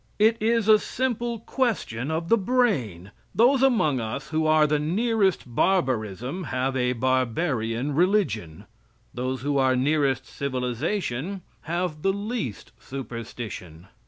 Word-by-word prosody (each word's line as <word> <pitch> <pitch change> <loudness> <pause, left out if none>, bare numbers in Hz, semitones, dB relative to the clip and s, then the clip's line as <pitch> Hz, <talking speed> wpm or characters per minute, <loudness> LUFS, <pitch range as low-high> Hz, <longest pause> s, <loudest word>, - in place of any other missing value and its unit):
It 220 +2 +4
is 225 -1 +2
a 215 -1 +7
simple 240 -2 -2
question 215 - -1
of 160 +1 -2 0.2
brain. 135 - 0 0.2
Those 255 +3 +5
among 185 - +3
us 110 -1 -4
who 155 0 0
are 155 0 +5
the 150 0 +1
nearest 195 +4 +1
barbarism 130 - 0
have 130 0 -1
a 125 -1 +1
barbarian 130 0 0
religion. 140 - 0 0.5
Those 130 +1 -3
who 145 -1 +1
are 130 -1 +3
nearest 135 -1 +1
civilization 140 - -3 0.2
have 170 -2 -2
the 195 +3 +2
least 205 - -4
superstition. 115 - -7
145 Hz, 120 wpm, -25 LUFS, 125-200 Hz, 0.5 s, a